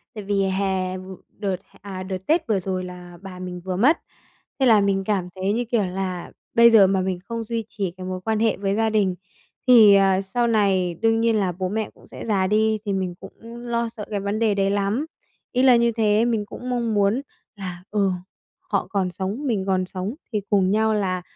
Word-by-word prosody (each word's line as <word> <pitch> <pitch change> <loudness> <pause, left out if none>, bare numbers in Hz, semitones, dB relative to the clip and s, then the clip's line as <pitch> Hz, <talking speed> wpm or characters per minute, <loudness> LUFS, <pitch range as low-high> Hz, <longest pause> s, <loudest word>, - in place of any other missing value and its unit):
Tại 210 - -6
vì 200 0 +1
hè 190 -1 -1
vửa 185 0 -9
đợt, 200 -3 -3 0.3
à, 190 -2 -6
đợt 190 0 -4
tết 325 +2 +2
vừa 205 -4 +2
rồi 185 0 -3
là 180 -1 -10
bà 185 -2 -9
mình 180 -1 -6
vừa 185 - -2
mất. 265 - +4 0.6
Thế 265 - +3
là 220 -4 +6
mình 195 -1 +1
cảm 190 -4 -1
thấy 190 +2 -1
như 240 +1 -1
kiểu 225 -3 +1
là 185 -1 -4 0.2
bây 235 0 +7
giờ 205 -4 +7
mà 190 -1 +1
mình 185 -1 -2
không 230 0 -3
duy 230 0 -3
trì 195 -4 -3
cái 185 +1 -9
mối 185 0 -4
quan 220 +1 -1
hệ 225 -1 +2
với 195 0 -1
gia 225 +1 +2
đình 200 -4 +1 0.5
thì, 220 -5 +8
ờ, 195 -1 +4
sau 235 +5 -1
này 195 -6 +2
đương 225 0 +3
nhiên 230 -1 +3
là 195 -4 +1
bố 185 +1 -3
mẹ 220 +2 -2
cũng - - -19
sẽ - - -9
già 195 -4 +1
đi 215 +2 +2
thì 200 - -1
mình 185 -2 -2
cũng 195 - -11 0.2
lo 235 -1 -2
sợ 220 -3 -8
cái 205 - -1
vấn 200 +2 -2
đề 220 -2 +2
đấy 195 0 +1
lắm. 205 +8 0 0.5
Ý 255 0 +1
là 255 -2 +7
như 235 0 +3
thế, 220 -1 +2
mình 225 -3 0
cũng 250 +4 -8
mong 235 -3 -1
muốn 205 +5 +2 0.3
là, 180 -3 -7
ừ, 200 -2 +2 0.5
họ - - -2
còn 190 -3 0
sống, 200 +10 -4
mình 205 -6 0
còn 185 -1 +1
sống 190 +6 -5 0.2
thì 210 - 0
cùng 195 -2 +3
nhau 220 +1 +2
là 185 -3 -1
200 Hz, 225 wpm, -23 LUFS, 185-225 Hz, 0.6 s, thì